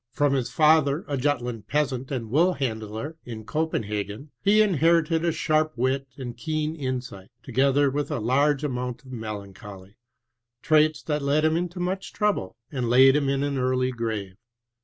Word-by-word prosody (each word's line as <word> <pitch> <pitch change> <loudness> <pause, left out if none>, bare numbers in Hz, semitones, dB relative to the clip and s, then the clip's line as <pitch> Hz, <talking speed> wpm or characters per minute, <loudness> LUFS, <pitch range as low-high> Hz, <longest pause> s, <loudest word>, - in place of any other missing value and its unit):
From 145 +3 +1
his 130 -3 0
father, 155 -1 +3
a 145 - -2
Jutland 125 -5 -2
peasant 135 -3 -1
and 115 -5 -4
woolhandler 135 - -1
in 110 -3 -8
Copenhagen, 105 -3 -3
he 205 +2 +4
inherited 165 -4 +3
a 170 - +2
sharp 155 0 +1
wit 130 +2 0
and 125 -3 -6
keen 155 0 -2
Insight, 130 -8 -5
together 140 +1 +2
with 145 +1 -2
a 150 - -2
large 135 +5 +2
amount 125 -1 -3
of 130 - -12
melanoioly, 100 -3 -8 0.7
traits 155 -1 +3
that 150 -1 -1
led 145 +2 +2
him 155 0 +3
into 175 +1 -3
much 185 +2 -3
trouble, 205 - -1 0.2
and 125 -5 -2
laid 130 +2 +6
him 140 -2 +1
in 135 0 0
an 145 -1 -1
earlv 130 0 +1
grave. 110 -6 -4
135 Hz, 160 wpm, -25 LUFS, 120-155 Hz, 0.7 s, laid